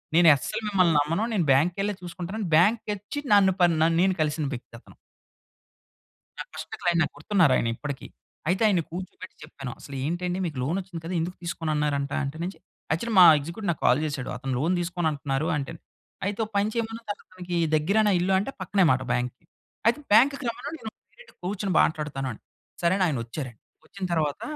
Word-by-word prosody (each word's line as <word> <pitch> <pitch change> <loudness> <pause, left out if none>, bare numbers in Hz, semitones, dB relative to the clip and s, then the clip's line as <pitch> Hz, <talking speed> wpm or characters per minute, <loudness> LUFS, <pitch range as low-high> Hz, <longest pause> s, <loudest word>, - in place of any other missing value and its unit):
"నేను 170 -1 +7
అస్సలు 135 - -4
మిమ్మల్ని 185 -4 +3
నమ్మను. 165 +8 0
నేను 180 -6 +1
బ్యాంక్ 150 +7 +4
కెళ్ళే 205 +1 0
చూసుకుంటాను" 175 +4 -6
అని 195 - -2
బ్యాంక్‌కి 210 +4 +3
అచ్చి 210 +9 -6
నన్ను, 195 -2 +6
ప - - +7 0.2
నే 160 - +5
నేను 190 0 +3
కలిసిన 150 0 0
వ్యక్తి 125 -2 -9
అతను. - - -19 1.4
నా - - -2
ఫస్ట్ 155 0 -8
క్లయింట్ 175 -2 +2
నాకు - - -4
గుర్తున్నారు 165 -2 +3
ఆయన - - +1
ఇప్పటికి. 140 +1 -6 0.4
అయితే 185 +4 +1
ఆయన్ని 185 -6 +2
కూర్చోబెట్టి 185 +1 -8
చెప్పాను. 135 -4 -7
"అసలు 140 - -9
ఏంటండి 175 +4 -2
మీకు 150 -6 -4
లోన్ 160 +8 0
వచ్చింది 180 -3 -8
కద, 170 - -4
ఎందుకు 180 +2 -4
తీసుకోనున్నారంట" 150 -4 -1
అంటే, 140 +3 -4 0.5
యాక్చువల్లి 225 +9 -1
మా 180 - +11
ఎగ్జిక్యూటివ్, 170 +7 -5
నాకు 160 - -6
కాల్ 125 +4 +5
చేశాడు. 145 -4 -4
అతను 135 +1 -3
లోన్ 165 +6 +1
తీసుకోను 175 -1 -1
అంటున్నారు 140 +1 -2
అంటే, 140 +3 -4 0.5
అయితే 200 +1 -2
ఒక - - -13
పని 205 +2 +2
చేయమను, 230 0 -3
అతనికి 180 -3 -6 0.2
దగ్గరేనా 200 +7 +3
ఇల్లు 190 +2 +1
అంటే, 205 +8 -3
పక్కనే 190 0 +2
మాట 130 0 +1
బ్యాంక్‌కి 125 0 -3 0.4
అయితే 235 +5 +3
బ్యాంక్‌కి 275 +6 +5
రమ్మను, 230 - -6
నేను 220 - -6 0.2
డైరెక్ట్ - - -17
కూర్చొని 195 +1 -2
మాట్లాడుతాను 150 -4 -1
అని. 110 - -11 0.4
సరే 170 +1 +3
అని, 190 - +2
ఆయన 145 - -1
వచ్చారండి. 120 -2 -7 0.3
వచ్చిన 195 - -10
తర్వాత, 150 -3 0
170 Hz, 180 wpm, -26 LUFS, 150-195 Hz, 1.4 s, మా